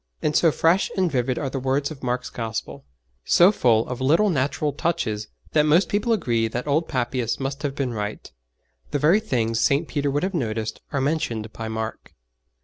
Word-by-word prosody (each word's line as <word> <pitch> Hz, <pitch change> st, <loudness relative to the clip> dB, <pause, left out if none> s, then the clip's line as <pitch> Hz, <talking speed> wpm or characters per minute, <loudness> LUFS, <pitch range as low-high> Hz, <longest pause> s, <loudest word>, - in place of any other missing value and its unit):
And 150 Hz, -1 st, +1 dB
so 165 Hz, -, +5 dB
fresh 165 Hz, +5 st, +2 dB
and 185 Hz, -3 st, +2 dB
vivid 125 Hz, -1 st, 0 dB
are 135 Hz, -3 st, -2 dB
the 135 Hz, -, -2 dB
words 135 Hz, +3 st, 0 dB
of 145 Hz, -, -9 dB
Mark's 125 Hz, 0 st, -2 dB
Gospel, 115 Hz, -, -5 dB, 0.4 s
so 175 Hz, +3 st, +6 dB
full 115 Hz, -, +2 dB
of 125 Hz, 0 st, -5 dB
little 165 Hz, +10 st, +3 dB
natural 145 Hz, 0 st, 0 dB
touches, 120 Hz, -11 st, -2 dB, 0.2 s
that 155 Hz, -, +4 dB
most 165 Hz, +6 st, +4 dB
people 205 Hz, +3 st, 0 dB
agree 115 Hz, -, +1 dB
that 120 Hz, +2 st, -4 dB
old 150 Hz, +3 st, +1 dB
Papias 120 Hz, -2 st, -1 dB
must 135 Hz, +1 st, -3 dB
have 140 Hz, -2 st, -2 dB
been 135 Hz, -4 st, -2 dB
right. 105 Hz, -1 st, -5 dB, 0.6 s
The -, -, 0 dB
very 160 Hz, +9 st, +4 dB
things 115 Hz, -, -1 dB
St. 140 Hz, +6 st, +2 dB
Peter 145 Hz, -1 st, -1 dB
would 145 Hz, +3 st, -1 dB
have 190 Hz, +1 st, -1 dB
noticed 110 Hz, -7 st, -2 dB
are 140 Hz, -, 0 dB
mentioned 120 Hz, -7 st, -2 dB
by 115 Hz, -, -5 dB
Mark. 110 Hz, 0 st, -5 dB
135 Hz, 190 wpm, -23 LUFS, 115-155 Hz, 0.6 s, so